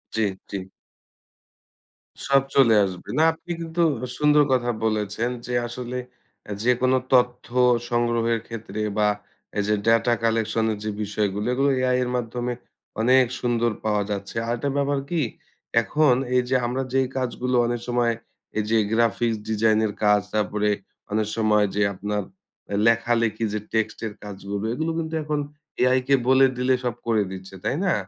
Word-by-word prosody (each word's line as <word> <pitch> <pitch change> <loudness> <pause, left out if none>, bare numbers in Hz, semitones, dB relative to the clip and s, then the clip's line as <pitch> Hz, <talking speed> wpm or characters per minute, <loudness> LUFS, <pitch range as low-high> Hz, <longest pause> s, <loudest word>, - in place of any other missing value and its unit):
জি, 110 - +1 0.3
জি। 100 - -2 1.7
সব 140 0 +5
চলে 125 -5 +6
আসবে। 90 -2 -7
না - - +5
আপনি 170 +2 -10
কিন্তু 165 +1 -2 0.4
সুন্দর 150 0 +5
কথা 120 -1 +1 0.2
বলেছেন 110 +2 -1 0.2
যে 125 - -4
আসলে, 125 +1 -5 0.5
এ - - -5
যেকোনো 125 +1 +3 0.2
তথ্য 125 -1 +3 0.4
সংগ্রহের 120 -1 +1
ক্ষেত্রে 110 -2 -6 0.2
বা 105 0 +3 0.5
এই 100 - +2
যে 105 - +3
ডেটা 115 +1 +4
কালেকশন 115 0 +1
এর 105 - -3
যে 110 - -2
বিষয়গুলো, 105 +1 -1
এগুলো 135 +2 +2
এআই 125 0 +2
এর 125 - -2
মাধ্যমে 120 +1 -2 0.5
অনেক 130 +2 +5
সুন্দর 120 -1 +1
পাওয়া 105 -1 +1
যাচ্ছে। 100 +1 -5
আরেকটা 120 +4 -1
ব্যাপার 140 0 +1
কি? 170 -3 0 0.6
এখন 145 +5 +3 0.2
এই 125 - +5
যে 130 - +2
আমরা 130 +2 -1
যেই 135 -1 +2
কাজগুলো 125 0 -1
অনেক 120 -1 -2
সময় 120 -1 +2 0.4
এই 110 - +2
যে 115 - +3 0.2
গ্রাফিক্স 115 0 +2
ডিজাইন 110 0 +3
এর 105 - -2
কাজ, 105 -1 +5
তারপরে 105 0 0 0.4
অনেক 105 0 +1
সময় 105 -1 +3
যে 105 - +1
আপনার 105 +2 -2 0.7
লেখালেখি 115 -1 +2
যে 105 - -1
টেক্সটের 110 -1 -1
কাজগুলো, 100 0 -5
এগুলো 160 +5 -1
কিন্তু 160 0 -4
এখন 150 -1 -1 0.4
এআই 130 +1 +4
কে 140 - +5
বলে 130 +1 +6
দিলে 130 +1 +2
সব 120 -2 -1
করে 110 -3 +3
দিচ্ছে। 95 0 -9
তাই - - 0
না? 180 - +3
115 Hz, 155 wpm, -24 LUFS, 105-125 Hz, 1.7 s, চলে